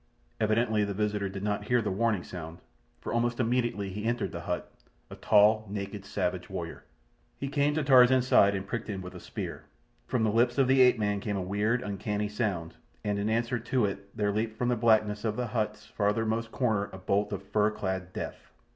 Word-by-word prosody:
Evidently 110 0 +2
the 100 -1 -2
visitor 105 -1 -1
did 95 0 -6
not 105 0 -1
hear 125 +3 +3
the 105 -3 -1
warning 105 -2 +1
sound, 85 -2 -8 0.4
for - - -4
almost 120 +1 0
immediately 120 -4 0
he 105 +2 -5
entered 120 0 -1
the 85 - -5
hut—a 90 +1 -7
tall, 110 +1 +4
naked, 100 0 -5
savage - - -2
warrior. - - -6 0.5
He 140 - -4
came 145 +1 +1
to 155 - +1
Tarzan's 130 -1 +6
side 100 -5 +5
and 95 0 -3
pricked 115 +3 -4
him 95 -2 -4
with 90 - -8
a - - -9
spear. - - -6 0.4
From 115 - 0
the 110 - +2
lips 120 +3 +2
of 135 -2 +4
the 130 0 +5
ape 125 -1 +6
man 105 -2 0
came 100 0 -2
a - - -2
weird, 105 +6 0
uncanny 105 0 -2
sound, 100 -6 -2 0.3
and 105 -1 -1
in 105 +2 0
answer 120 +2 0
to 120 0 +1
it 100 0 -6
there 105 -1 +1
leaped 110 +1 -2
from 125 +1 0
the 125 - +2
blackness 110 -2 +2
of 110 -2 -1
the 125 - -1
hut's 105 -2 -2
farthermost 110 +2 0
corner 110 -6 0
a 95 - -8
bolt 100 +3 0
of 100 -1 -4
fur 105 +2 +2
clad 95 -3 -4
death. - - -7
105 Hz, 205 wpm, -29 LUFS, 100-115 Hz, 0.5 s, Tarzan's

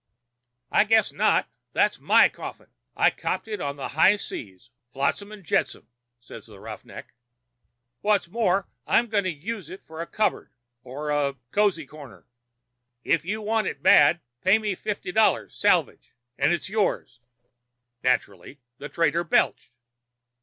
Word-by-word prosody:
"'I - - +4
guess 220 +1 +3
not. - - +2 0.3
That's - - +2
my - - +5
coffin. - - -9 0.3
I - - +4
copped - - -3
it 210 -4 -5
on 140 0 -3
the 140 - -6
high 160 +10 +4
seas—flotsam 125 - -5
and 210 -2 -11
jetsam,' 155 - -1 0.3
says 120 - -12
the - - -14
'roughneck.' - - -10 0.9
'What's 205 -4 +2
more, 195 -1 0 0.2
I'm 235 0 +3
going 205 -3 +1
to - - +1
use 185 +3 -6
it 185 +2 -10
for 160 +1 -9
a 170 - -5
cupboard 215 - -1 0.3
or 150 +4 -5
a 145 -2 0 0.2
cozy 200 -7 +1
corner. 145 -2 -13 0.8
If 165 -1 +1
you 215 +3 -3
want 220 0 0
it - - -5
bad 175 - +6 0.2
pay 190 +3 +5
me 215 -2 -2
fifty 200 -1 -5
dollars 220 +3 +2
salvage - - +1 0.2
and 135 +4 +2
it's 175 - -1
yours.' 190 - -1 0.8
Naturally 125 -1 -1 0.2
the 145 - -7
trader 170 0 +1
belched. 170 - +1
175 Hz, 145 wpm, -25 LUFS, 145-210 Hz, 0.9 s, bad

